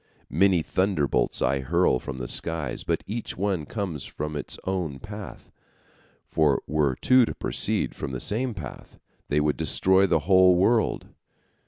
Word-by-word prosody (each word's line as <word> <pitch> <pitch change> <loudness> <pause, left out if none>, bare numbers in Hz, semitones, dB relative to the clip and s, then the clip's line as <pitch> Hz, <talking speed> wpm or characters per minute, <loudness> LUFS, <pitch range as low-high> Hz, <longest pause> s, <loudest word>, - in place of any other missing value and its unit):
Many 90 +1 +3
thunderbolts 95 -8 0
I 70 - +1
hurl 65 -1 +2
from 65 - -7
the 60 -1 -5
skies, 80 -3 -2
but - - -1
each 115 +3 -5
one 95 -6 -1
comes 90 - -4
from 75 0 -5
its 75 - -5
own 90 -7 -2
path, 105 +7 -10 0.7
for 75 -3 +1
were 75 -4 +1
two 130 - +4
to - - -2
proceed - - -2
from - - -5
the 65 - -4
same 120 - -1
path, 75 -9 -9 0.3
they 75 - +2
would 75 0 +1
destroy 95 +5 +3
the 80 - +2
whole 95 -1 +6
world. 110 +5 +1
85 Hz, 155 wpm, -25 LUFS, 75-100 Hz, 0.7 s, whole